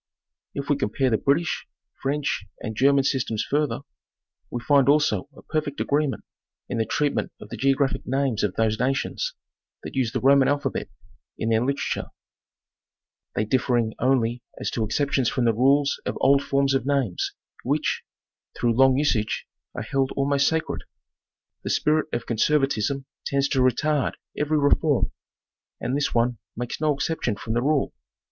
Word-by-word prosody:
If 140 0 -4
we 145 - +2
compare 130 +1 0
the 110 - +2
British, 170 +5 0 0.3
French 140 -5 -1
and 110 -2 -5
German 140 +3 +4
systems 130 -5 0
further, 150 0 0 0.7
we 120 - -3
find 140 +2 +4
also 145 -1 +2
a - - -13
perfect 155 -2 -2
agreement 145 -1 0 0.4
in - - -3
the 110 - 0
treatment 145 -1 0
of - - -11
the - - -5
geo 135 0 +2
graphic 140 -1 -1
names 135 -4 0
of 105 - 0
those 110 -1 +1
nations 135 - -1 0.5
that - - -7
use 125 -4 0
the - - -1
Roman 135 0 +5
alphabet 140 -6 -1 0.5
in 110 - -1
their 110 0 +3
literature, 140 +2 -1 1.3
they 105 - +1
differmg 120 -2 +1
only 120 -2 +1 0.2
as - - -2
to 115 - -1
exceptions 135 +3 +1
from 125 - 0
the 115 - +4
rules 140 +5 +3
of - - -3
old 140 +1 +5
forms 140 -1 +1
of 135 - +1
names, 135 -9 0 0.3
which, - - 0 0.6
through 120 -1 +2
long 130 +2 +5
usage, 120 -7 0 0.3
are - - -3
held 135 -1 0
almost 140 0 +2
sacred. 160 0 -1 0.8
The - - -3
spirit 155 +1 +2
of - - -2
conservatism 135 +1 +1 0.2
tends 140 0 +1
to 135 - +1
retard 135 +3 +2 0.2
every 150 +1 +1
reform, 145 -1 +2 0.7
and 130 - -2
this 145 0 0
one 120 -1 +1 0.2
makes 120 +4 -4
no 155 -1 +3
exception 135 -5 -1
from 110 - -4
the 120 - +1
rule. 145 +1 +1
135 Hz, 160 wpm, -25 LUFS, 120-145 Hz, 1.3 s, Roman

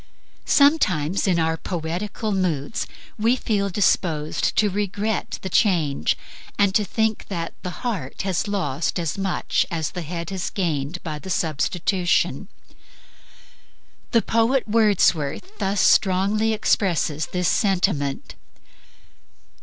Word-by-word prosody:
Sometimes 200 - +3
in 180 -3 +3
our 160 0 +1
poetical 180 +7 -3
moods 180 -2 -1 0.3
we 230 +4 +3
feel 205 -5 -1
disposed 170 -5 +1
to 215 - +4
regret 205 +1 -2
the - - -3
change, 165 - +2 0.4
and 200 -1 +3
to 210 - +3
think 220 +2 -1
that 170 -4 -4
the 180 +5 -7
heart 195 - -3
has 190 0 -1
lost 170 -7 -1
as 165 -3 -2
much 195 -2 0
as 165 -4 -2
the 180 - -5
head 170 +2 -5
has 185 -3 -2
gained 165 -2 -2
by 155 -3 -4
the 190 - -9
substitution. 175 +3 0 1.6
The 230 - +3
poet 230 +3 +2
Wordsworth 210 - +1
thus 195 0 +1
strongly 200 +3 +3
expresses 170 -8 +1
this 180 -1 -1
sentiment 180 -9 0
185 Hz, 115 wpm, -23 LUFS, 165-210 Hz, 1.6 s, to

